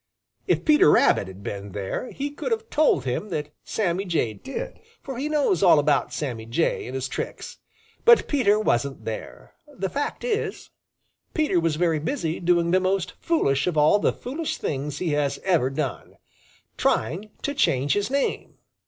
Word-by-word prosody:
If - - +1
Peter 300 - +6
Rabbit 100 - +4
had 95 +1 -11
been 100 -1 -6
there, 100 - -4
he 285 +1 -4
could 290 +11 -5
have 450 0 -2
told 295 - +3
him 130 +12 -2
that 150 -4 -4
Sammy 190 -3 -1
Jay 160 - 0
did, 470 - -7 0.2
for 265 -3 -6
he 295 +3 -2
knows 285 - +2
all 175 -5 +7
about 145 -1 +2
Sammy 120 -7 -4
Jay 130 +9 0
and 130 - -6
his 130 0 -2
tricks. - - -6 0.4
But 475 0 +6
Peter 215 -8 +3
wasn't 135 - 0
there. 110 -1 -7
The 250 -10 -4
fact 290 +1 -3
is, 460 -3 -2 0.6
Peter 300 - +2
was 165 -2 0
very 165 -1 +1
busy 165 - -2
doing 170 -1 +2
the 185 - +4
most 185 -1 0
foolish 140 - +1
of 175 -3 -1
all 150 +7 +5
the - - +2
foolish 295 +6 -4
things 145 +1 -3
he 175 +2 -2
has 145 -2 0
ever 170 -9 +2
done 135 -1 -4 0.6
trying 175 - 0
to 285 - -1
change 140 - +2
his 205 +2 0
name. 275 +1 -1
170 Hz, 170 wpm, -24 LUFS, -, 0.6 s, all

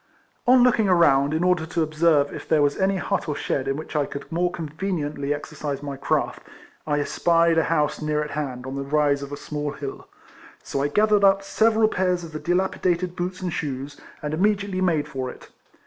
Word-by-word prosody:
On 250 0 +7
looking 230 -5 +3
around, 145 -6 +4
in 160 +2 0
order 180 -3 +2
to 165 0 0
observe 155 -2 +2
if - - -8
there 150 -2 +4
was 145 0 +2
any 195 0 +1
hut 175 - -2
or 150 - -1
shed 135 -1 -2
in 135 - 0
which 155 +1 -8
I 145 -2 +1
could 140 - -8
more 175 +2 +1
conveniently 155 -3 -3
exercise 145 -1 -4
my 140 -1 -4
craft, 135 - -1 0.5
I 145 -1 +1
espied 165 +2 +2
a 160 - +1
house 150 -2 0
near 150 0 0
at 150 - -7
hand, 130 -4 -4
on 130 - -5
the 140 - -3
rise 145 0 +1
of 140 0 -7
a 145 - -5
small 150 0 -4
hill. 140 -2 -7 0.6
So 135 - -3
I 140 - +2
gathered 210 +6 +3
up 195 0 +5
several 220 +2 +3
pairs 180 -3 0
of 165 - -8
the 155 - -5
dilapidated 180 0 0
boots 180 +1 -4
and 180 -3 -2
shoes, 140 -1 -5 0.2
and 150 0 -3
immediately 200 +1 0
made 165 -5 +1
for 130 -1 -4
it. - - -12
155 Hz, 205 wpm, -24 LUFS, 145-180 Hz, 0.6 s, On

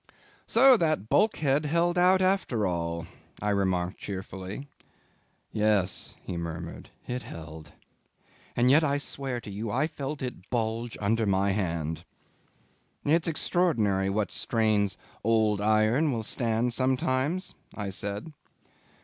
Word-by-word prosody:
"So 255 +2 +7
that 155 - 0
bulkhead 150 -8 +2
held 170 +3 +2
out 185 +1 +5
after 185 - +1
all," 85 -2 -2 0.3
I 105 +1 0
remarked 95 -2 0
cheerfully. 95 +5 -6 0.8
"Yes," 105 -3 +1
he 90 - -5
murmured, 85 0 -6 0.2
"it 125 +1 -3
held. 80 -4 -10 0.8
And 125 +2 +4
yet 155 +4 +6
I 140 -2 +2
swear 135 -3 -4
to 105 - -8
you 105 +3 -4
I 150 - +1
felt 150 -2 -5
it 125 -6 -6
bulge 115 0 -2
under 110 +2 +1
my 100 0 +2
hand." 85 -5 -2 1.0
"It's 160 +3 +3
extraordinary 115 - +1
what 105 +1 0
strains 110 -3 +1 0.3
old 110 -2 +2
iron 110 +8 +3
will 115 -3 -2
stand 115 +1 0
sometimes," 130 +7 0 0.2
I 100 -2 -4
said. 100 - -4
110 Hz, 125 wpm, -28 LUFS, 100-145 Hz, 1.0 s, So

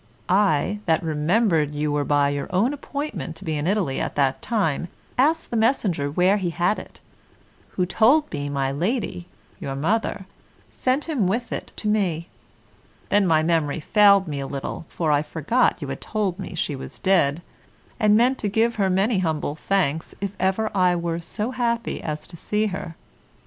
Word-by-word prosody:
I, 195 0 +2
that 160 0 +2
remembered 160 0 +1
you 150 0 -1
were 145 0 +1
by 145 0 +2
your 145 0 -3
own 205 +9 +2
appointment 285 - -5
to 195 - -9
be 160 -2 -1
in 150 +2 -2
Italy 190 -9 0
at - - -3
that 135 -2 +1
time, 175 - 0 0.3
asked 310 +6 +2
the - - -2
messenger 215 - +1
where 180 +7 +3
he 185 -4 -1
had 175 +5 0
it, - - -13 0.7
who 180 - +1
told 250 - +3
me 145 0 -3
my 135 -1 -1
lady, 170 - -2 0.3
your 135 - -4
mother, 195 +6 -1 0.5
sent 260 +3 0
him 265 - +1
with 235 +6 -1
it - - -5
to 215 - -4
me; 185 -6 0 0.8
then 205 -2 +3
my 160 -2 +3
memory 160 -2 +1
failed 200 +3 +5
me 145 -2 -3
a 135 - -4
little, 140 +4 -5
for 160 -3 -1
I 145 -1 +3
forgot 160 - 0
you - - -4
had 135 - -5
told 205 -4 -2
me 190 - -6
she 150 -3 -1
was 135 - -8
dead, 175 -4 +2 0.6
and 210 -2 +5
meant 250 +3 +3
to 205 - -1
give 225 +3 +1
her 195 -2 +2
many 195 +3 +2
humble 160 -5 -1
thanks 165 -3 -1
if 200 0 -4
ever 190 +4 +1
I 180 -2 +4
were 170 -1 -2
so 210 +7 -4
happy 235 -2 -1
as 150 -1 -4
to 175 - -11
see 210 +5 -1
her. 170 -3 -6
180 Hz, 180 wpm, -23 LUFS, 150-215 Hz, 0.8 s, failed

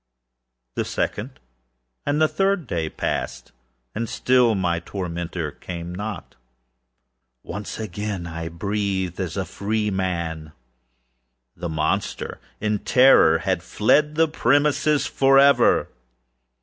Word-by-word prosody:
The - - -1
second 125 +6 -3 0.7
and 145 +1 +1
the 155 - +5
third 195 -1 0
day 80 -8 -2
passed, - - -4 0.4
and 115 +1 -3
still 125 -3 +3
my 85 -3 0
tormentor 85 -3 -4
came 85 +1 -7
not. 105 +1 -6 1.1
Once 105 0 -6
again 105 -3 -4
I 80 0 -5
breathed 95 0 -2
as 95 0 -3
a 95 - -1
freeman. 95 -8 -2 1.0
The 85 0 -5
monster, 80 -1 -2 0.2
in 105 -1 0
terror, 125 -12 +6
had 95 0 -1
fled 150 - +2
the 165 +1 +4
premises 145 +1 +2
forever! 135 +1 +4
100 Hz, 105 wpm, -23 LUFS, 85-125 Hz, 1.1 s, terror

